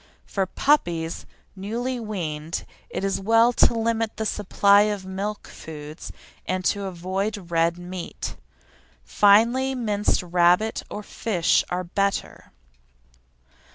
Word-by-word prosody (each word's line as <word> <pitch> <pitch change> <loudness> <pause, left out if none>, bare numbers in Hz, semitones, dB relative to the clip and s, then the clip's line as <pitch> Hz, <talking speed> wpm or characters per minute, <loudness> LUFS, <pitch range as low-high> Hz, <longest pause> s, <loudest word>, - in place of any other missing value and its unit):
For 195 -2 -1
puppies 175 - 0 0.3
newly 235 +6 -3
weaned 170 -7 -4 0.2
it - - -4
is 195 -1 0
well 225 +4 +4
to 235 - +4
limit 225 -1 -1
the 220 - -2
supply 200 -1 +4
of 200 -2 -4
milk 200 +2 -4
foods 150 0 -9 0.4
and 185 0 -2
to 200 -1 +1
avoid 190 +1 -3
red 165 +1 +2
meat. 175 0 -6 0.7
Finely 235 +6 +4
minced 210 -5 0
rabbit, 180 +5 +2
or 210 - -6
fish 195 -5 +1
are 180 +1 -2
better. 195 +3 -2
195 Hz, 115 wpm, -24 LUFS, 175-220 Hz, 0.7 s, well